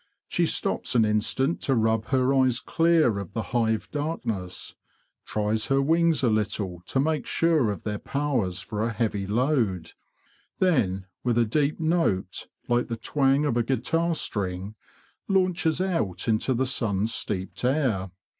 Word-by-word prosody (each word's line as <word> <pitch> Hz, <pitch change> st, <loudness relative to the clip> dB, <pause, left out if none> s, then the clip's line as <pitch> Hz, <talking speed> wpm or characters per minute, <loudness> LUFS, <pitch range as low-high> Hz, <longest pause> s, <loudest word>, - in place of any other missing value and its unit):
She -, -, +1 dB
stops -, -, -1 dB
an 115 Hz, -2 st, +5 dB
instant 115 Hz, +8 st, 0 dB
to 135 Hz, -, +1 dB
rub 110 Hz, -1 st, +1 dB
her 130 Hz, +2 st, +2 dB
eyes 130 Hz, -2 st, +3 dB
clear 165 Hz, -11 st, +2 dB
of 100 Hz, -4 st, -7 dB
the 115 Hz, -, -2 dB
hive 110 Hz, -2 st, +1 dB
darkness; 115 Hz, -, -4 dB, 0.5 s
tries 105 Hz, +1 st, 0 dB
her 135 Hz, 0 st, +2 dB
wings 165 Hz, +2 st, +2 dB
a 120 Hz, -, +4 dB
little 100 Hz, -4 st, -1 dB
to 135 Hz, -, 0 dB
make 150 Hz, 0 st, 0 dB
sure 160 Hz, -8 st, +2 dB
of 100 Hz, -, -4 dB
their 105 Hz, -1 st, -3 dB
powers 130 Hz, -11 st, -1 dB
for 105 Hz, -1 st, -4 dB
a 115 Hz, +1 st, 0 dB
heavy 105 Hz, -4 st, -1 dB
load; 110 Hz, -, 0 dB, 0.7 s
then, 100 Hz, -, +1 dB, 0.2 s
with 120 Hz, -2 st, +1 dB
a 120 Hz, -, +4 dB
deep 145 Hz, +8 st, 0 dB
note 160 Hz, -, 0 dB, 0.2 s
like 120 Hz, 0 st, +1 dB
the 115 Hz, -, -4 dB
twang 135 Hz, +4 st, +2 dB
of 135 Hz, -5 st, 0 dB
a -, -, +3 dB
guitar 165 Hz, +7 st, 0 dB
string, 95 Hz, -6 st, -3 dB, 0.5 s
launches 185 Hz, -4 st, +1 dB
out 110 Hz, -, -1 dB
into 115 Hz, +3 st, +1 dB
the 130 Hz, +3 st, +1 dB
sun 110 Hz, -6 st, 0 dB
steeped 95 Hz, -4 st, -3 dB
air. 125 Hz, -8 st, +1 dB
120 Hz, 155 wpm, -26 LUFS, 105-145 Hz, 0.7 s, an